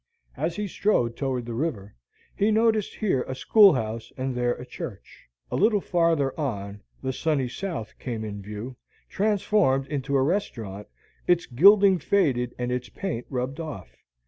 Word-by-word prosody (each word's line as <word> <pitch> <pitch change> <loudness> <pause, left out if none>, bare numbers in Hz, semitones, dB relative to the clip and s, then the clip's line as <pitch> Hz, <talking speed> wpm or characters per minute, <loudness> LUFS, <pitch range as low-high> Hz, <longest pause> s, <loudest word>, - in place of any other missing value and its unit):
As 160 +5 -2
he 210 0 -2
strode 125 - +1
toward 130 -3 -2
the 120 - -5
river, 115 -7 -3 0.4
he 205 - +2
noticed 220 -1 +2
here 185 -12 0
a 130 - -4
schoolhouse 115 - +4
and 130 0 -2
there 120 0 0
a 125 - -9
church. 120 -4 -9 0.2
A - - -1
little 210 +1 +3
farther 165 -7 +1
on, 100 -7 -4 0.2
"The 130 0 -1
Sunny 145 -3 0
South" 130 - -5
came 115 -4 -4
in 100 -1 -6
view, 105 +5 -7 0.3
transformed 200 -9 +2
into 140 -1 -2
a 130 - +3
restaurant, 115 - -2 0.4
its 175 -1 +3
gilding 195 - +6
faded 135 -9 +1
and 125 0 -2
its 125 0 -3
paint 170 -12 -4
rubbed 130 +3 -3
off. 150 - -7
135 Hz, 155 wpm, -26 LUFS, 120-185 Hz, 0.4 s, gilding